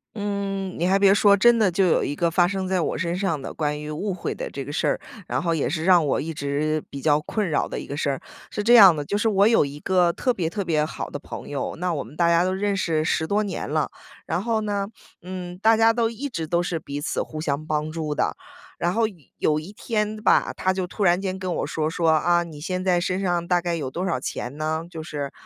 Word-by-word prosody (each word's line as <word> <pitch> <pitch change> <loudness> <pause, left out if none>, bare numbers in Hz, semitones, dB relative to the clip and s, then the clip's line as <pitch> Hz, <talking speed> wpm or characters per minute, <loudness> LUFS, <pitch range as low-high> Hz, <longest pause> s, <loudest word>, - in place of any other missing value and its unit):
嗯， 200 -2 -3
你 170 - +1
还 190 +2 +3
别 195 -1 +6
说 200 0 +6
真 235 +4 +5
的 210 -5 +3
就 185 +2 +2
有 165 - +3
一 145 - -2
个 170 +2 +1
发 175 +1 +3
生 190 0 -2
在 185 -1 +1
我 - - -1
身 170 0 -2
上 170 -7 -1
的 - - -6
关 150 -1 -2
于 150 - -6
误 190 +6 -3
会 175 - -4
的 - - -5
这 135 - -6
个 145 - -7
事 150 - -1
儿， - - +1 0.3
然 - - -1
后 170 -1 0
也 150 - 0
是 160 +2 -2
让 180 -4 +5
我 140 - +1
一 165 - -4
直 150 +1 -1
比 140 - -6
较 150 0 +3
困 205 +5 -2
扰 150 - +1
的 - - -5
一 - - -8
个 140 - -5
事 140 - 0
儿。 135 - -4 0.3
是 210 - -3
这 240 +3 +6
样 195 -7 +9
的， 145 - -3
就 200 +8 -2
是 210 - +1
我 200 -1 +4
有 225 -8 +4
一 140 +1 -7
个 180 0 +2
特 250 - 0
别 180 -9 -1
特 205 +1 -2
别 155 -4 +1
好 155 - -6
的 - - -5
朋 - - -9
友， 140 -2 -3
那 180 0 0
我 140 - -2
们 - - -14
大 170 +1 +2
家 170 0 +4
都 185 +1 0
认 200 +1 0
识 160 -4 0
10 160 0 0
多 205 +5 +1
年 205 -2 -3
了。 - - 0 0.4
然 180 - -1
后 225 -1 0
呢， 205 -2 -2 0.4
嗯， 180 -1 -6
大 220 +4 +4
家 225 +1 +5
都 230 -1 0
一 270 +5 -5
直 165 -10 -4
都 170 +2 +1
是 175 -2 -2
彼 145 -1 -6
此 - - -1
互 155 - -7
相 150 0 -2
帮 155 0 -1
助 155 -2 -3
的。 - - 0 0.4
然 175 +1 +1
后 230 - +1 0.3
有 150 0 +1
一 170 +6 -10
天 210 0 -2
吧， - - +4
他 185 - +1
就 185 -1 -2
突 205 - -3
然 175 +1 +4
间 190 -1 -3
跟 185 -2 -2
我 - - -1
说， 155 -1 -1
说： 165 0 +1
“啊， 175 +2 +3
你 160 -3 -10
现 185 +4 -3
在 180 -2 +3
身 185 +2 -1
上 175 -2 0
大 175 -1 +2
概 175 -1 -1
有 145 -5 -3
多 170 +7 -4
少 130 - 0
钱 130 +1 -5
呢？ 155 +1 -1
就 160 - -6
是， 145 -3 -5
175 Hz, 285 characters per minute, -24 LUFS, 155-195 Hz, 0.4 s, 样